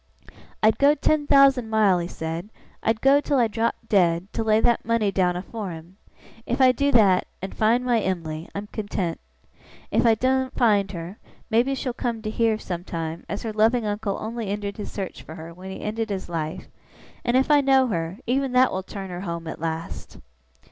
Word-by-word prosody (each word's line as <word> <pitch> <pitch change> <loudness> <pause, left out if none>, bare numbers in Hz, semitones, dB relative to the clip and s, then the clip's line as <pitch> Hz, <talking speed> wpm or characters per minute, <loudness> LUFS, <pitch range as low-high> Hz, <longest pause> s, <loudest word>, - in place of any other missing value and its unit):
'I'd 220 0 +4
go 285 +1 +5
ten 300 0 +1
thousand 275 -5 +5
mile,' 210 -5 +3
he 170 - -3
said, 165 +4 -5 0.3
'I'd 225 0 0
go 275 +2 +5
till 285 -1 0
I 240 -2 +4
dropped 230 +1 -2
dead, 180 -2 +2
to 225 - -1
lay 215 0 +3
that 235 +1 +2
money 225 -3 +1
down 180 -2 +1
afore 200 +3 -5
him. 165 +2 -10 0.5
If 245 - -1
I 260 -1 +7
do 280 +3 +1
that, 200 -6 +4
and 190 - -6
find 235 +3 +2
my 240 -2 +3
Em'ly, 165 -4 -3
I'm 200 +1 -4
content. 205 -5 -3 0.7
If - - +2
I 225 - +5
doen't 260 +2 0
find 205 -5 +3
her, 170 +4 -7 0.3
maybe 245 +5 +2
she'll 255 -2 -3
come 235 -3 -3
to 215 - -3
hear, 225 -1 +1
sometime, 170 -4 -5
as 200 - -4
her 225 -2 -3
loving 220 +2 +2
uncle 205 -1 -2
only 225 0 -4
ended 200 0 -3
his 210 - -6
search 195 -3 -5
for 160 - -10
her 165 0 -9
when 185 +2 -10
he 190 - -7
ended 220 +1 -3
his 195 -2 -4
life; 165 +1 -4 0.6
and 240 +1 +2
if 265 +3 +2
I 290 -1 +6
know 270 -1 +4
her, 165 -1 -3
even 265 +1 0
that 255 0 +5
will 190 - -2
turn 190 0 -8
her 175 0 -5
home 170 -3 -5
at 160 - -7
last! 165 0 -5
215 Hz, 200 wpm, -24 LUFS, 180-240 Hz, 0.7 s, I